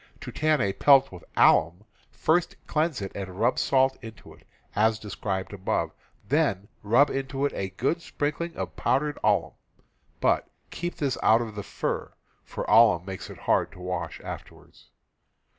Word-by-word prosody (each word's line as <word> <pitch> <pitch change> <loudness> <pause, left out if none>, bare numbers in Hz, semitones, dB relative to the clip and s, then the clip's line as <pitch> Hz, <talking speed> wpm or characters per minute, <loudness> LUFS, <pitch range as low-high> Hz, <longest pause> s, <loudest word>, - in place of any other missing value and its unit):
To - - -7
tan 155 -3 +1
a 100 -2 +1
pelt 135 +3 +5
with 90 -3 -11
alum, 85 +5 +4 0.3
first 170 +2 +1
cleanse 155 -7 -1
it 95 - -5
and 95 -1 -7
rub 120 +3 +2
salt 135 0 +2
into 115 -2 -11
it, - - -22 0.3
as 110 +1 +3
described 100 -2 -4
above, 95 -1 -1 0.4
then 130 - +1
rub 120 +8 +4
into 135 +1 -2
it 145 - -1
a 95 - -3
good 135 - -1
sprinkling 160 +3 -3
of - - -5
powdered 145 +3 0
alum, 95 -7 +2 0.7
but - - +1 0.2
keep 175 +1 -4
this 140 -4 -2
out 110 +2 +5
of 115 -2 -5
the 105 - -5
fur, - - -4 0.3
for - - -6
alum 85 +1 +5
makes 95 -1 -7
it - - -10
hard - - +1
to - - -14
wash 90 0 -4
afterwards. - - -11
115 Hz, 160 wpm, -26 LUFS, 95-145 Hz, 0.7 s, pelt